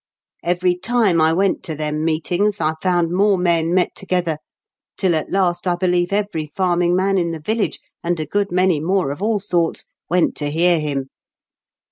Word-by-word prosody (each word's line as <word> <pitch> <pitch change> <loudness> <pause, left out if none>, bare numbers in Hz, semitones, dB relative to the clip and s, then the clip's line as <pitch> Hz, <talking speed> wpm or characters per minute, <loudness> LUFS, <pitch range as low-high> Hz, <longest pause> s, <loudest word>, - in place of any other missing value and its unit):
" - - -71
Every 180 +1 +1
time 205 -4 +2
I 160 0 +4
went 190 +3 +1
to 160 - -4
them 150 0 -2
meetings 175 +6 0
I 155 -1 +1
found 175 -3 +1
more 195 +2 +3
men 170 -2 +1
met 180 0 +2
together, 175 -5 -1 0.6
tiU 185 -3 +2
at 155 -2 -2
last 180 -2 0
I 175 - +2
beKeve 175 0 +1
every 200 -6 -1
farming 175 +1 +1
man 195 +1 +2
in 170 -1 0
the 165 -1 -4
viUage, 215 +8 -1 0.3
and 170 -1 -1
a 155 - -2
good 200 +1 -1
many 180 -3 +2
more 180 -2 0
of 145 - -7
all 215 +1 +1
sorts, 175 -4 -1 0.2
went 180 0 +2
to 145 -1 -2
hear 170 +2 +3
him. 140 -3 -3
175 Hz, 185 wpm, -20 LUFS, 160-190 Hz, 0.6 s, I